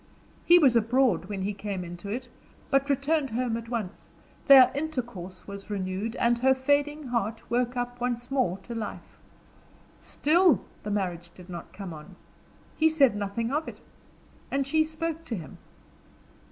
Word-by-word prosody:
He 345 - +9
was 275 -8 +5
abroad 230 -4 +3
when 195 -1 -4
he 205 +2 -1
came 200 -2 -4
into 175 +3 -8
it, 250 +4 -4 0.4
but 275 0 +2
returned 280 +1 +1
home 240 0 -1
at 230 0 -6
once; 220 -6 -5 0.4
their 270 -2 +9
intercourse 240 - -5
was 200 0 -9
renewed, 200 +3 -3
and 235 -1 +2
her 265 +2 +4
fading 290 +1 0
heart 230 -2 -2
woke 245 +1 0
up 245 0 -3
once 245 0 -2
more 250 -10 +1
to 235 - -7
life. 225 -2 -7 0.8
Still, 340 +3 +3 0.2
the 210 - -5
marriage 180 -4 -2
did 180 0 -12
not 170 - -8
come 195 -4 -7
on; 150 -1 -11 0.6
he 320 0 +4
said 280 -8 +4
nothing 205 +4 -2
of 305 +3 -1
it, - - -8 0.7
and 275 0 0
she 315 +3 +3
spoke 320 +1 -4
to 235 - -3
him. 165 -7 -9
240 Hz, 160 wpm, -27 LUFS, 200-275 Hz, 0.8 s, He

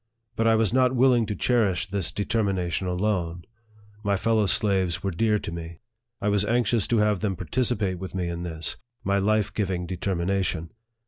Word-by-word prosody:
But 115 - +1
I 115 - +5
was 110 0 +2
not 130 0 +3
willing 125 -3 +4
to 105 - -2
cherish 105 -9 +1
this 95 -3 -1
determination 95 -4 -1
alone. 90 -2 -1 0.6
My 100 -1 +1
fellow 110 0 +2
slaves 95 -3 +1
were 95 - 0
dear 105 +5 +2
to 100 - -5
me. 85 0 -7 0.4
I 100 - -2
was 105 -1 +2
anxious 115 -1 +1
to 120 - +2
have 105 -2 +2
them 95 0 -1
participate 100 0 -1
with 95 0 -7
me 90 -2 -1
in 85 0 -4
this, 80 -2 -3 0.3
my 100 +1 +1
life 105 +1 +1
giving 95 -4 -1
deter 90 +2 -2
mination. 85 -2 -1
100 Hz, 180 wpm, -25 LUFS, 90-110 Hz, 0.6 s, I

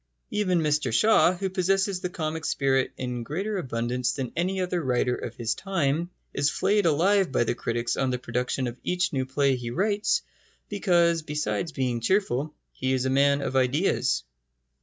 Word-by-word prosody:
Even 185 -5 +1
Mr 150 -4 +1
Shaw, 185 - +4
who 190 +2 -2
possesses 190 +1 +1
the 180 - -2
comic 160 -3 -4
spirit 135 -2 +1
in 125 -1 -3
greater 195 - -3
abundance 125 -3 -1
than 130 -4 -4
any 185 +3 0
other 180 -1 -1
writer 125 -3 +1
of - - -5
his 115 -1 -1
time, 170 -3 -1 0.2
is 145 0 +2
flayed 200 +1 +2
alive 185 +3 +3
by - - +2
the - - 0
critics 120 0 -2
on 135 -1 0
the 125 - 0
production 125 +2 -2
of 120 0 -5
each 180 -1 0
new 130 -1 -1
play 135 0 +2
he 120 -2 -5
writes, 205 - +1 0.5
because, 175 -5 +2
besides 150 -2 -2
being 125 -5 -1
cheerful, 150 - +1 0.2
he 130 0 -1
is 130 0 0
a 130 - +1
man 140 +1 +3
of 135 - -3
ideas. 130 - +1
145 Hz, 175 wpm, -26 LUFS, 125-185 Hz, 0.5 s, Shaw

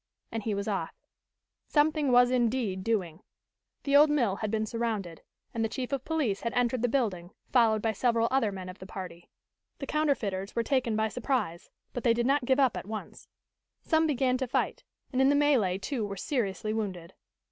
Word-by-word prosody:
And 225 - -3
he 215 -1 -2
was 200 +1 -3
off. 195 -6 -2 0.7
Something 300 -2 +2
was 245 0 +6
indeed 235 -6 0
doing. 185 -6 -1 0.6
The 280 0 +1
old 295 +1 +8
mill 240 -10 +1
had 215 - -3
been 220 0 0
surrounded 215 -7 -3 0.3
and 230 - -1
the 225 - 0
chief 250 +3 -4
of 275 -2 -2
police 285 -11 -1
had 235 - -2
entered 245 0 +1
the 245 - +2
building, 205 -9 -1 0.2
followed 220 -4 +4
by 225 - +2
several 230 +1 +1
other 260 -6 +2
men 190 -2 -7
of 185 +2 -9
the 190 - -9
party. 180 -3 -8 0.5
The 275 - -5
counterfeiters 225 -11 -1
were 235 - +1
taken 255 -4 0
by 220 0 +1
surprise, 225 -8 -2 0.2
but 245 - -4
they 230 -2 +4
did 235 0 0
not 275 0 +2
give 260 +2 +2
up 265 -4 +3
at - - -6
once. 215 0 -7 0.6
Some 320 -1 +2
began 260 -3 +1
to 260 0 -2
fight, - - -1 0.3
and 255 - +2
in 265 - +5
the 285 - +4
melee 265 -11 +3
two 235 +3 -3
were 200 -1 -4
seriously 215 -2 -2
wounded. 190 -5 -4
230 Hz, 195 wpm, -29 LUFS, 200-265 Hz, 0.7 s, old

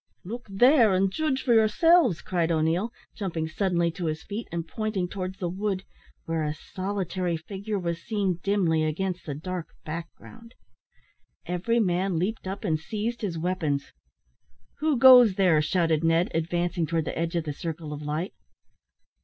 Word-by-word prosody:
"Look 235 +5 -7
there, 230 0 +5
and 190 +1 +2
judge 290 0 -1
for 245 - +3
yourselves," 230 - +4
cried 170 -2 0
O'Neil, 165 +7 +1 0.2
jumping 170 -6 -3
suddenly 170 0 0
to 175 +1 -5
his 155 0 -3
feet, 215 +3 -5
and 170 -1 -3
pointing 215 -3 -2
towards 185 0 -5
the 180 - -2
wood, 190 +1 -2 0.4
where 165 -1 -1
a 150 0 -2
solitary 185 -1 -3
figure 200 +5 -5
was 170 -2 -3
seen 195 -4 -1
dimly 175 -6 +2
against 180 +4 -2
the 145 - -3
dark 180 +2 -5 0.2
background. 170 +8 -9 0.9
Every 190 +7 0
man 185 -3 +1
leaped 190 +4 -2
up 195 +4 -5
and 160 -6 0
seized 220 +7 -4
his 185 -6 -2
weapons. 160 -5 -2 0.9
"Who 305 -2 +1
goes 245 -5 +8
there?" 180 -6 +4
shouted 165 0 +1
Ned, 165 +2 +2
advancing 170 +1 -1
towards 165 -1 0
the - - -4
edge 170 +1 -2
of 170 - 0
the 150 -2 -4
circle 160 0 -5
of 150 - -7
light. 150 +5 -3
180 Hz, 160 wpm, -26 LUFS, 165-205 Hz, 0.9 s, goes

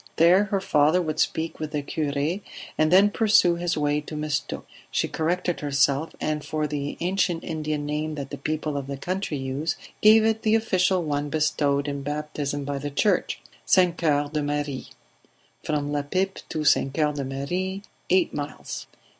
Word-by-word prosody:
There 180 +5 +5
her 205 -1 0
father 155 -2 +3
would 155 -3 -2
speak 160 0 0
with 155 -1 -3
the 145 -1 -1
cure, 150 +4 -1 0.4
and 155 +1 +2
then 195 +3 +6
pursue 210 -5 +4
his 170 -1 -1
way 145 0 +1
to 155 - -8
Mistook. 150 -1 -3 0.2
She - - 0
corrected 175 +2 -1
herself, 140 +1 +1
and 150 -1 -1
for 155 -1 -2
the 145 -1 -3
ancient 180 -1 0
Indian 155 -2 -3
name 150 +1 -2
that 140 -2 -6
the - - -6
people 155 0 -2
of 135 -1 -4
the 140 0 -4
country 180 0 -3
use, 140 +4 -2 0.3
gave 215 +1 +7
it 220 0 +1
the 220 0 +3
official 185 -5 +2
one 145 -1 -1
bestowed 145 -2 +1
in 140 -1 -3
baptism 145 -1 -3
by 140 0 -2
the 145 +1 -4
church 180 +7 +1 0.2
St. 180 -3 +4
Coeur 145 -4 +1
de 150 - 0
Marie. 145 -2 -2 0.8
From 145 -1 -1
La 145 0 0
Pipe 190 +7 -1
to 155 -1 -2
St. 135 -1 +3
Coeur 150 +1 +1
de 145 -1 -3
Marie, 180 +9 -3 0.3
eight 185 -1 +3
miles 145 0 -5
155 Hz, 175 wpm, -25 LUFS, 145-175 Hz, 0.8 s, gave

